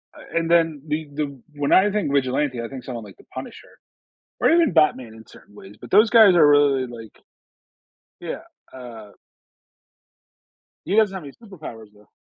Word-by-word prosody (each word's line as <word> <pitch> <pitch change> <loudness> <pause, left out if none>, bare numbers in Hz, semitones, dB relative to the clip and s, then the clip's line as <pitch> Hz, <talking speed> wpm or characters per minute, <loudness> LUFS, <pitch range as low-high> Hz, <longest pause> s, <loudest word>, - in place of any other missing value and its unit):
uh, - - -8
and 165 0 -1
then 165 -3 +2
the 155 +1 -3
the 140 -3 -4 0.2
When 145 -1 -2
I 195 +2 +5
think 205 -8 -1
vigilante, 130 -1 0
I 115 - -5
think 130 -1 -9
someone 120 -3 -7
like 100 -3 -14
the - - -20
Punisher, 130 - -10 0.6
or - - +3
even 335 - +3
Batman 130 -8 +1
in 110 - -14
certain 105 - -19
ways, 100 0 -14
but - - -12
those 215 +3 +5
guys 220 -5 +7
are 170 -4 +6
really 145 -3 +3
like 115 -3 -12 1.0
Yeah, - - -6 0.3
uh 115 -5 -11 1.8
He 190 - -2
doesn't 215 -3 +3
have 190 -4 -7
any 140 - -10
superpowers, 155 - -12
though. 105 0 -23
145 Hz, 170 wpm, -22 LUFS, 120-170 Hz, 1.8 s, guys